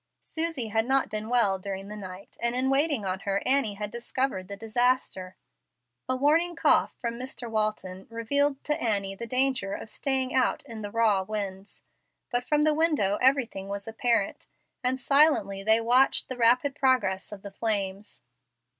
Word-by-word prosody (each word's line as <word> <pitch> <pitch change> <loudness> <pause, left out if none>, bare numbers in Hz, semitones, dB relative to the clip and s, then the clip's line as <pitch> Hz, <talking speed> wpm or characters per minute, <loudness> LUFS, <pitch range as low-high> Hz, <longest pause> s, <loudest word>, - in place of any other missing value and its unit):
Susie 320 -8 -2
had 220 +2 0
not 270 -4 +2
been 215 +1 -4
well 210 -6 +3
during 195 0 -6
the 210 - -7
night, 190 -1 -10
and 235 +1 +2
in 260 +1 +2
waiting 280 -5 +1
on 185 0 -2
her, 200 0 -1
Annie 260 -6 +1
had 210 0 -5
discovered 235 -4 -2
the 200 - -7
disaster. 225 -4 0 0.7
A 255 - +1
warning 320 +6 +2
cough - - +3
from 235 -1 -4
Mr. 255 -1 -5
Walton 215 -4 -2
revealed 275 +5 0
to 300 - -2
Annie 200 -4 -1
the 230 +4 -7
danger 255 -5 0
of - - -8
staying 265 -2 -2
out 260 - +1
in 230 -5 -8
the 205 - -5
raw 215 -3 +2
winds; 195 -1 -6 0.5
but 245 0 0
from 300 +3 +1
the 310 0 +3
windows 295 -11 +1
everything 250 -7 +2
was 200 +1 -5
apparent, 225 -2 -1 0.4
and 255 +1 +1
silently 275 -9 +3
they 220 +3 +4
watched 245 +4 +3
the 255 - -4
rapid 245 +4 +3
progress 255 -10 +1
of 205 -2 -9
the 200 - -8
flames. 200 - -3
230 Hz, 170 wpm, -27 LUFS, 200-265 Hz, 0.7 s, they